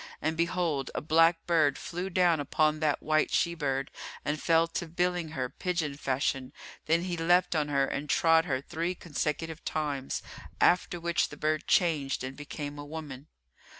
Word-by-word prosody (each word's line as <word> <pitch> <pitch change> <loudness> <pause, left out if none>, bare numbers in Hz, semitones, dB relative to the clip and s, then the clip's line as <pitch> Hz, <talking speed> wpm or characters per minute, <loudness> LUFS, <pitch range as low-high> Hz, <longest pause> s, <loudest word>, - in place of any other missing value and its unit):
And 160 +1 -1
behold, 170 -5 0
a - - 0
black 165 +2 +3
bird 155 -5 +3
flew 180 +2 -4
down 175 -3 +3
upon 155 +2 +1
that 155 -2 0
white 155 0 +2
she 170 - +1
bird 135 -4 -2 0.3
and 150 +1 -1
fell 165 0 +4
to 170 - -3
billing 175 0 0
her 130 -1 0
pigeon 165 -1 -2
fashion, 135 -1 -1 0.3
then 165 +2 +3
he 180 -1 -2
leapt 175 +1 +3
on 150 -2 +1
her 140 -2 +2
and 145 +2 -4
trod 165 0 +4
her 130 -6 -1
three 170 +5 -3
consecutive 160 -1 -3
times, 145 -4 -2 0.4
after 175 0 +3
which 170 0 0
the - - -10
bird 155 +1 -1
changed 150 -8 +2
and 130 +1 -5
became 145 0 -6
a - - -5
woman. 145 -2 -8
155 Hz, 170 wpm, -29 LUFS, 145-170 Hz, 0.4 s, fell